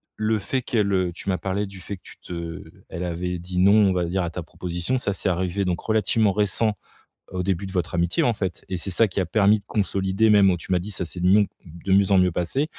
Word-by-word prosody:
le 110 Hz, 0 st, 0 dB
fait 130 Hz, +6 st, -2 dB
qu'elle, 105 Hz, -6 st, 0 dB
heu, 90 Hz, -2 st, +1 dB
tu 90 Hz, -, -11 dB
m'as 95 Hz, -2 st, +1 dB
parlé 100 Hz, +2 st, -2 dB
du 95 Hz, -2 st, -11 dB
fait 100 Hz, +3 st, -6 dB
que -, -, -30 dB
tu -, -, -13 dB
te 85 Hz, -2 st, -6 dB, 0.2 s
elle 85 Hz, -, -5 dB
avait 90 Hz, +1 st, -3 dB
dit: 90 Hz, +1 st, -4 dB
«Non», 100 Hz, +2 st, +6 dB, 0.2 s
on -, -, +2 dB
va 90 Hz, -2 st, 0 dB
dire 90 Hz, +2 st, -1 dB
à 85 Hz, -, -2 dB
ta 90 Hz, -, -6 dB
proposition, 90 Hz, +7 st, -3 dB
ça, 115 Hz, -5 st, -1 dB
c'est 100 Hz, -, -2 dB
arrivé 95 Hz, +2 st, 0 dB
donc 90 Hz, -1 st, -1 dB
relativement 110 Hz, -1 st, +2 dB
récent 105 Hz, +2 st, +1 dB, 0.6 s
au 90 Hz, -1 st, -2 dB
début 95 Hz, 0 st, -1 dB
de 95 Hz, -, -6 dB
votre 90 Hz, -1 st, -2 dB
amitié, 85 Hz, 0 st, +1 dB
en 120 Hz, -2 st, +2 dB
fait 95 Hz, -4 st, -4 dB
et 95 Hz, -, -2 dB
c'est 95 Hz, -, -2 dB
ça 110 Hz, +5 st, +4 dB
qui 95 Hz, -, -5 dB
a 90 Hz, -, 0 dB
permis 105 Hz, +3 st, +4 dB
de 100 Hz, -, -31 dB
consolider 100 Hz, +1 st, +1 dB
même, 100 Hz, -2 st, +6 dB
heu, 90 Hz, -, -2 dB
tu 90 Hz, -, -9 dB
m'as 90 Hz, -, +4 dB
dit: 100 Hz, +5 st, -6 dB
«Ça 90 Hz, -3 st, -2 dB
c'est 90 Hz, +1 st, -5 dB
mion 100 Hz, +3 st, +5 dB, 0.2 s
de 85 Hz, +3 st, -5 dB
mieux 100 Hz, 0 st, +4 dB
en 95 Hz, -, +6 dB
mieux 90 Hz, -2 st, +3 dB
passer». 130 Hz, -, -1 dB
95 Hz, 265 wpm, -24 LUFS, 90-100 Hz, 0.6 s, Non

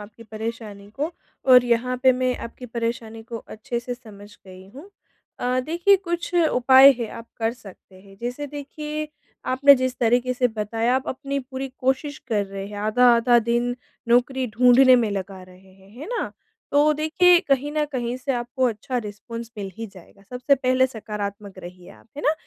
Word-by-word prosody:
आपकी 210 Hz, +2 st, -12 dB
परेशानी 220 Hz, -2 st, -7 dB
को, 295 Hz, +9 st, -4 dB, 0.3 s
और 250 Hz, -2 st, +7 dB
यहाँ 245 Hz, +1 st, 0 dB
पे 260 Hz, -1 st, +6 dB
मैं 255 Hz, 0 st, -1 dB
आपकी 250 Hz, +2 st, -11 dB
परेशानी 230 Hz, -1 st, -4 dB
को 230 Hz, +1 st, -7 dB
अच्छे 235 Hz, +2 st, -5 dB
से 245 Hz, +1 st, -5 dB
समझ 210 Hz, -4 st, -14 dB, 0.2 s
गई 185 Hz, 0 st, -13 dB
हूँ। 320 Hz, +9 st, -12 dB, 0.5 s
अ, 250 Hz, +1 st, 0 dB
देखिए, 345 Hz, +5 st, +3 dB
कुछ 345 Hz, -2 st, -4 dB
उपाय 265 Hz, -5 st, +6 dB
है, 230 Hz, -, -3 dB
आप 230 Hz, 0 st, -10 dB
कर 225 Hz, 0 st, 0 dB
सकते 200 Hz, -5 st, -15 dB
हैं। 195 Hz, 0 st, -17 dB
जैसे 245 Hz, +5 st, -4 dB
देखिए 300 Hz, +2 st, -6 dB, 0.4 s
आपने 275 Hz, +2 st, +6 dB
जिस 255 Hz, -1 st, -2 dB
तरीक़े 245 Hz, +2 st, +2 dB
से 250 Hz, 0 st, +1 dB
बताया, 225 Hz, +2 st, -1 dB
आप 265 Hz, -, -4 dB
अपनी 275 Hz, +1 st, -3 dB
पूरी 265 Hz, 0 st, -6 dB
कोशिश 265 Hz, +2 st, -1 dB
कर 210 Hz, -3 st, 0 dB
रहे 195 Hz, 0 st, -7 dB
हैं, 205 Hz, -, -9 dB
आधा-आधा 240 Hz, +3 st, +4 dB
दिन 235 Hz, +1 st, 0 dB, 0.3 s
नौकरी 250 Hz, +2 st, +2 dB
ढूँढने 255 Hz, +1 st, +6 dB
में 230 Hz, -4 st, +1 dB
लगा 195 Hz, -1 st, -5 dB
रहे 185 Hz, +1 st, -18 dB
हैं, 190 Hz, 0 st, -21 dB
है 300 Hz, -, -7 dB
ना। 480 Hz, +1 st, -3 dB, 0.4 s
तो 295 Hz, +2 st, +4 dB
देखिए, 320 Hz, +4 st, +4 dB
कहीं 280 Hz, -3 st, 0 dB
न 305 Hz, -1 st, +1 dB
कहीं 245 Hz, -1 st, -2 dB
से 270 Hz, +2 st, -3 dB
आपको 245 Hz, +2 st, -2 dB
अच्छा 230 Hz, +3 st, -4 dB
रिस्पॉन्स 230 Hz, +3 st, -8 dB
मिल 195 Hz, -1 st, -5 dB
ही 225 Hz, 0 st, -5 dB
जाएगा। 190 Hz, +2 st, -17 dB
सबसे 250 Hz, +3 st, +2 dB
पहले 255 Hz, 0 st, +2 dB
सकारात्मक 205 Hz, -4 st, -7 dB
रहिए 180 Hz, 0 st, -11 dB
आप, -, -, -18 dB
है -, -, -6 dB
ना, 300 Hz, -, +3 dB
245 Hz, 180 wpm, -23 LUFS, 215-265 Hz, 0.5 s, और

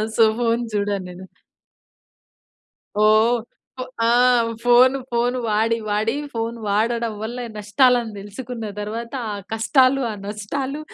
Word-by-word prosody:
So, 225 Hz, -, +5 dB, 0.2 s
phone 230 Hz, 0 st, +1 dB
చూడను 200 Hz, -2 st, -1 dB
నేను. 180 Hz, +1 st, -10 dB, 1.8 s
ఓహ్! 220 Hz, +3 st, +4 dB, 0.4 s
ఫో 255 Hz, -, -3 dB, 0.2 s
ఆ! -, -, +3 dB, 0.6 s
ఫోన్ 250 Hz, +2 st, +6 dB, 0.2 s
ఫోన్ 240 Hz, +1 st, +1 dB
వాడి, 225 Hz, +2 st, +1 dB
వాడి 215 Hz, +4 st, 0 dB, 0.2 s
ఫోన్ 230 Hz, 0 st, -3 dB
వాడడం 230 Hz, +2 st, 0 dB
వల్ల 235 Hz, +3 st, -5 dB, 0.2 s
నష్టాలను 240 Hz, +2 st, +2 dB
తెలుసుకున్న 220 Hz, +2 st, -7 dB
తర్వాత 230 Hz, +3 st, -5 dB, 0.2 s
ఆ -, -, -3 dB, 0.2 s
కష్టాలు, 260 Hz, +4 st, +3 dB
ఆ -, -, -5 dB
నష్టాలు 260 Hz, +8 st, -4 dB
230 Hz, 115 wpm, -21 LUFS, 210-245 Hz, 1.8 s, ఫోన్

